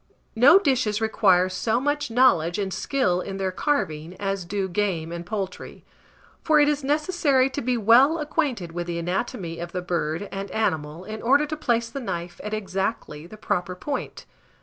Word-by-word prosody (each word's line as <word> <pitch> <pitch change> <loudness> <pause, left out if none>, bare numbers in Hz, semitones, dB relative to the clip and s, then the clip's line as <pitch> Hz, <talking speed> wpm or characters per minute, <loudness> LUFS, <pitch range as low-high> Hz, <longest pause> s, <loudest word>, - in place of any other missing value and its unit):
No 265 +10 +7
dishes 255 - +1
require 200 -5 +3
so 220 +5 0
much 290 +1 -1
knowledge 180 -9 +3
and 195 -2 -2
skill 200 -11 0
in 195 0 -6
their 190 -1 -1
carving 180 - -2
as 195 -2 -2
do 195 +1 -2
game 175 -4 -2
and 170 0 -5
poultry; 190 -1 -6 0.6
for 310 -2 +4
it 290 - +5
is 295 -1 0
necessary 290 -3 +2
to 285 - -3
be 250 +1 0
well 245 +9 +5
acquainted 290 - -2
with 175 +1 -4
the 170 -1 -3
anatomy 175 -1 -3
of 170 0 -6
the 180 - -2
bird 170 +1 -2
and 195 0 -5
animal 160 -6 -2
in 215 +2 -7
order 280 +5 +3
to 305 +1 -4
place 235 -6 0
the 275 - -5
knife 175 -8 -5
at 210 - -5
exactly 190 -6 -3
the 215 - -12
proper 180 -4 -2
point. 280 +9 -5
205 Hz, 175 wpm, -24 LUFS, 180-265 Hz, 0.6 s, No